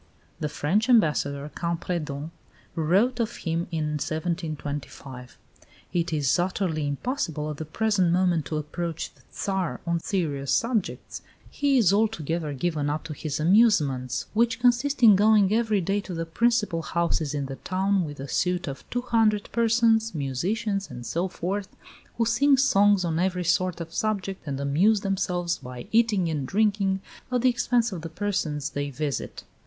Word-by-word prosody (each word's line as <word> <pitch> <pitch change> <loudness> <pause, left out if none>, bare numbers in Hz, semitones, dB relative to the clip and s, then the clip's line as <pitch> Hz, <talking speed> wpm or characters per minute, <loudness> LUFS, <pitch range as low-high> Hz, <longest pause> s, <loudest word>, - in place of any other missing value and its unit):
The 150 - -2
French 190 - 0
Ambassador, 150 - +2
Campredon, 165 -3 -3 0.4
wrote 195 +10 +2
of 230 0 -1
him 165 0 -2
in 155 -3 -2
1725: 150 -6 -5 0.6
"It 170 -1 0
is 150 0 +1
utterly 175 -4 -1
impossible 155 - -2
at 150 - -7
the 160 - -5
present 190 +1 +1
moment 175 -3 +2
to 155 - -2
approach 165 +2 -4
the - - -25
Tsar 190 -4 -2
on 170 0 0
serious 150 -8 -2
subjects; 230 -4 -1 0.3
he 280 -2 +2
is 200 -6 +4
altogether 170 -7 0
given 150 0 -1
up 150 +1 -2
to 165 -1 -6
his 150 0 -4
amusements, 155 - +3
which 230 +2 +2
consist 250 +3 +2
in 215 -3 +9
going 210 0 +4
every 220 -3 +2
day 195 +4 0
to 185 -3 -7
the 165 0 -3
principal 210 -1 +1
houses 165 -3 -1
in 140 -1 -2
the 135 0 -6
town 190 +1 0
with 145 -3 -7
a 135 - -5
suite 180 +4 0
of 135 -1 -7
200 225 -4 +1
persons, 225 -2 +2
musicians 195 - -2
and 120 -1 -8
so 170 +8 -1
forth, 190 +2 -3 0.5
who 230 - +2
sing 270 +5 +4
songs 205 -7 +4
on 165 -1 -1
every 180 0 0
sort 180 +1 +1
of 165 -1 -7
subject, 195 -4 -2
and 135 -1 -3
amuse 175 +10 +3
themselves 180 -3 -1
by 125 -1 -8
eating 220 -6 +3
and 150 -5 -2
drinking 200 -1 +1 0.3
at 250 -1 +1
the 255 - +6
expense 240 -1 +1
of 180 -4 -5
the 165 - -6
persons 160 -6 -2
they 145 0 -3
visit." 140 +1 -4
180 Hz, 160 wpm, -26 LUFS, 155-215 Hz, 0.6 s, in